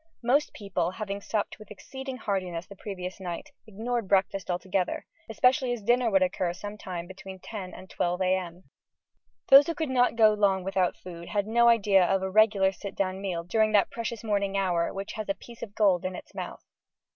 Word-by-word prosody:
Most 280 Hz, +6 st, +2 dB
people, 190 Hz, -4 st, -2 dB
having 200 Hz, +1 st, -5 dB
supped 215 Hz, +1 st, -3 dB
with 215 Hz, -, -13 dB
exceeding 265 Hz, +5 st, -7 dB
heartiness 185 Hz, -6 st, -3 dB
the 200 Hz, -, -12 dB
previous 185 Hz, -2 st, -6 dB
night, 185 Hz, -, -6 dB, 0.2 s
ignored 225 Hz, +1 st, -3 dB
breakfast 195 Hz, -1 st, +1 dB
altogether: 180 Hz, +1 st, -1 dB, 0.2 s
especially 250 Hz, +3 st, +2 dB
as 230 Hz, -4 st, -6 dB
dinner 240 Hz, +2 st, +3 dB
would 195 Hz, -3 st, +4 dB
occur 180 Hz, -1 st, -1 dB
some 205 Hz, +3 st, -7 dB
time 180 Hz, -4 st, -6 dB
between 190 Hz, +1 st, -10 dB
10 185 Hz, -1 st, -7 dB
and 185 Hz, -, -11 dB
12 175 Hz, 0 st, -1 dB
a.m. 185 Hz, -1 st, -1 dB, 0.9 s
Those 275 Hz, +1 st, +9 dB
who 335 Hz, -, -2 dB
could 315 Hz, -4 st, -2 dB
not 250 Hz, -2 st, +3 dB
go 220 Hz, -2 st, +6 dB
long 195 Hz, -3 st, +2 dB
without 190 Hz, -1 st, 0 dB
food 170 Hz, -2 st, -10 dB
had 205 Hz, -1 st, 0 dB
no 235 Hz, +2 st, +4 dB
idea 205 Hz, -5 st, +5 dB
of 190 Hz, +1 st, +1 dB
a 190 Hz, -, -2 dB
regular 205 Hz, -2 st, +4 dB
sit 195 Hz, +1 st, -8 dB
down 190 Hz, 0 st, -1 dB
meal 180 Hz, -4 st, -3 dB
during 215 Hz, +4 st, +1 dB
that 205 Hz, -2 st, +4 dB
precious 230 Hz, 0 st, -4 dB
morning 200 Hz, -2 st, 0 dB
hour 175 Hz, -3 st, +1 dB
which 195 Hz, +1 st, -6 dB
"has 215 Hz, -1 st, -5 dB
a 195 Hz, -, +1 dB
piece 235 Hz, +3 st, -14 dB
of 200 Hz, -, -7 dB
gold 190 Hz, -4 st, +3 dB
in 185 Hz, 0 st, -3 dB
its -, -, -11 dB
mouth." -, -, -7 dB
195 Hz, 195 wpm, -28 LUFS, 185-220 Hz, 0.9 s, Those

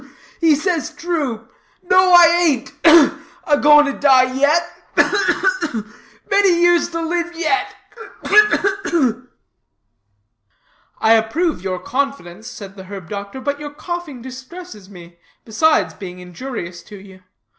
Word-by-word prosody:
"Ugh, -, -, -18 dB
ugh, -, -, -25 dB
ugh! -, -, -26 dB, 0.2 s
He 320 Hz, -2 st, +4 dB
says 330 Hz, +1 st, -3 dB
true. 285 Hz, -10 st, -4 dB, 0.4 s
No, 370 Hz, 0 st, +3 dB
I 350 Hz, -, +8 dB, 0.2 s
ain't 275 Hz, -5 st, 0 dB
ugh! 325 Hz, -3 st, +6 dB, 0.2 s
a 300 Hz, -, +2 dB
going 295 Hz, 0 st, +6 dB
to 280 Hz, -, -2 dB
die 260 Hz, -3 st, +3 dB
yet 300 Hz, +6 st, +2 dB, 0.3 s
ugh, -, -, +3 dB, 0.2 s
ugh, -, -, -1 dB, 0.3 s
ugh! 215 Hz, -2 st, -4 dB, 0.5 s
Many 395 Hz, -4 st, +3 dB
years 345 Hz, 0 st, +3 dB
to 330 Hz, -1 st, -4 dB
live 345 Hz, +1 st, -3 dB
yet, 370 Hz, +5 st, -1 dB, 0.5 s
ugh, -, -, -5 dB
ugh, 400 Hz, -2 st, +3 dB, 0.2 s
ugh!" 255 Hz, -5 st, 0 dB, 1.7 s
"I 220 Hz, -, +4 dB
approve 225 Hz, -, 0 dB
your 185 Hz, -1 st, -4 dB
confidence," 230 Hz, -2 st, -5 dB
said 195 Hz, -3 st, -10 dB
the 190 Hz, -1 st, -11 dB
herb 190 Hz, -3 st, -10 dB
doctor; 200 Hz, +4 st, -7 dB
"but 285 Hz, +2 st, -3 dB
your 290 Hz, -1 st, -9 dB
coughing 310 Hz, -6 st, -7 dB
distresses 260 Hz, -, -11 dB
me, 170 Hz, -3 st, -15 dB, 0.3 s
besides 275 Hz, +9 st, +1 dB
being 180 Hz, -3 st, -10 dB
injurious 180 Hz, -1 st, -8 dB
to 210 Hz, -, -14 dB
you. 190 Hz, -1 st, -15 dB
280 Hz, 150 wpm, -18 LUFS, 210-340 Hz, 1.7 s, I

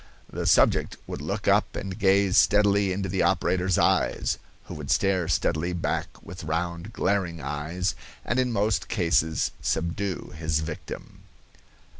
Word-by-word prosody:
The -, -, -2 dB
subject -, -, +3 dB
would -, -, -6 dB
look -, -, -4 dB
up -, -, +3 dB
and 95 Hz, -1 st, -5 dB
gaze 95 Hz, -1 st, +3 dB
steadily 100 Hz, -1 st, +4 dB
into 95 Hz, +1 st, -2 dB
the 95 Hz, +1 st, -1 dB
operator's 95 Hz, -1 st, +1 dB
eyes, -, -, +1 dB, 0.2 s
who -, -, -9 dB
would 75 Hz, -3 st, -7 dB
stare 95 Hz, -4 st, +2 dB
steadily 85 Hz, +2 st, 0 dB
back 85 Hz, -, -1 dB, 0.2 s
with 90 Hz, -2 st, -9 dB
round, 85 Hz, +5 st, -3 dB
glaring 95 Hz, -6 st, -1 dB
eyes, 75 Hz, +7 st, -2 dB, 0.3 s
and 120 Hz, -, 0 dB
in 125 Hz, -1 st, +1 dB
most 105 Hz, -1 st, 0 dB
cases 80 Hz, -3 st, +1 dB
subdue 90 Hz, +3 st, -2 dB
his 80 Hz, -1 st, -1 dB
victim. 80 Hz, 0 st, -7 dB
90 Hz, 140 wpm, -26 LUFS, 80-100 Hz, 0.3 s, steadily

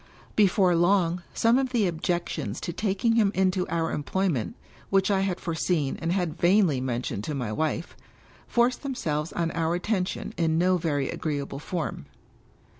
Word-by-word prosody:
Before 190 Hz, -3 st, +4 dB
long, 175 Hz, 0 st, +2 dB
some 230 Hz, +3 st, +3 dB
of 265 Hz, -1 st, 0 dB
the 235 Hz, -5 st, +2 dB
objections 165 Hz, -, -2 dB
to 170 Hz, -, -4 dB
taking 210 Hz, +4 st, +1 dB
him 210 Hz, -3 st, +4 dB
into 185 Hz, -1 st, +1 dB
our 165 Hz, -1 st, -1 dB
employment, 155 Hz, -, -1 dB, 0.3 s
which 195 Hz, +1 st, +3 dB
I 195 Hz, -, +3 dB
had 190 Hz, -2 st, -1 dB
foreseen 160 Hz, -4 st, -1 dB
and 165 Hz, +1 st, -1 dB
had 175 Hz, -3 st, -1 dB
vainly 175 Hz, -7 st, +4 dB
men 125 Hz, -1 st, -2 dB
tioned 100 Hz, -, -3 dB
to 150 Hz, -, -3 dB
my 125 Hz, -6 st, -3 dB
wife, 160 Hz, +7 st, -2 dB, 0.5 s
forced 240 Hz, +1 st, +2 dB
themselves 160 Hz, -, -2 dB
on 165 Hz, -1 st, -1 dB
our 165 Hz, 0 st, 0 dB
attention 190 Hz, +2 st, -2 dB
in 160 Hz, -2 st, +1 dB
no 180 Hz, +2 st, +3 dB
very 145 Hz, -5 st, -1 dB
agreeable 140 Hz, -3 st, -3 dB
form. 155 Hz, -, -4 dB
175 Hz, 160 wpm, -26 LUFS, 155-195 Hz, 0.5 s, Before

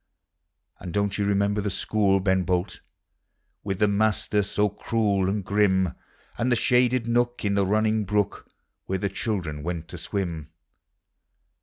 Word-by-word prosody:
And 90 Hz, -, -7 dB
don't 100 Hz, 0 st, 0 dB
you 100 Hz, -, +1 dB
remember 100 Hz, +1 st, +1 dB
the 100 Hz, -, -1 dB
school, 100 Hz, 0 st, +1 dB
Ben 95 Hz, 0 st, +2 dB
Bolt, 90 Hz, 0 st, -1 dB, 0.8 s
With 95 Hz, -2 st, -2 dB
the 105 Hz, -, +3 dB
master 105 Hz, 0 st, +1 dB
so 105 Hz, +1 st, +1 dB
cruel 105 Hz, -2 st, 0 dB
and 100 Hz, -1 st, -2 dB
grim. 95 Hz, -3 st, +2 dB, 0.5 s
And 125 Hz, +2 st, +1 dB
the -, -, +5 dB
shaded 125 Hz, 0 st, +2 dB
nook 120 Hz, 0 st, 0 dB
in 100 Hz, -, +1 dB
the 100 Hz, -1 st, +2 dB
running 110 Hz, +1 st, +1 dB
brook 105 Hz, +1 st, -1 dB, 0.4 s
Where 95 Hz, -, -1 dB
the 100 Hz, +2 st, -2 dB
children 95 Hz, -7 st, -3 dB
went 85 Hz, 0 st, -4 dB
to -, -, -7 dB
swim? 85 Hz, -6 st, -4 dB
100 Hz, 150 wpm, -25 LUFS, 95-105 Hz, 0.8 s, the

